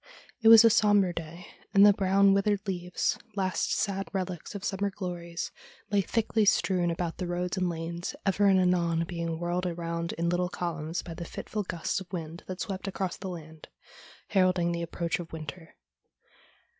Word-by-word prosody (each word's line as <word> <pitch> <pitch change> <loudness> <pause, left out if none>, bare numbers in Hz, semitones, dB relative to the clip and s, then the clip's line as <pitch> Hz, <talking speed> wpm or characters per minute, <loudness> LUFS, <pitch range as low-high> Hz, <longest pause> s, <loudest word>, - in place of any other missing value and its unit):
It 225 - +3
was 225 0 +10
a 230 - +7
sombre 205 -4 +4
day, 170 +1 -7 0.3
and 200 +1 +8
the 205 - +8
brown, 195 0 +4
withered 200 +1 +1
leaves 180 -1 -1
— 220 - -30
last 190 -2 0
sad 195 -1 -1
relics 185 0 -4
of 200 - -6
summer 200 0 -1
glories 175 -3 -5 0.2
— - - -26
lay 205 -1 +4
thickly 220 +2 +1
strewn 185 -3 +2
about 170 0 -3
the 180 - -2
roads 175 +1 -2
and 185 -2 0
lanes, 170 +1 -4
ever 200 +1 +3
and 190 -1 +5
anon 170 -2 +2
being 170 -1 -4
whirled 175 +1 -1
around 170 -1 -3
in 170 +1 -2
little 175 +1 +1
columns 165 -2 -3
by 170 - -7
the 170 +1 -6
fitful 210 +5 -5
gusts 175 -1 -2
of 180 - -12
wind 165 -1 -6
that 185 0 -6
swept 195 -1 -4
across 190 -2 -2
the 190 - -6
land, 160 -3 -9 0.6
heralding 185 -3 +3
the 170 0 -2
approach 170 0 -2
of 170 -1 -8
winter. 160 +1 -8
180 Hz, 180 wpm, -29 LUFS, 170-195 Hz, 0.6 s, was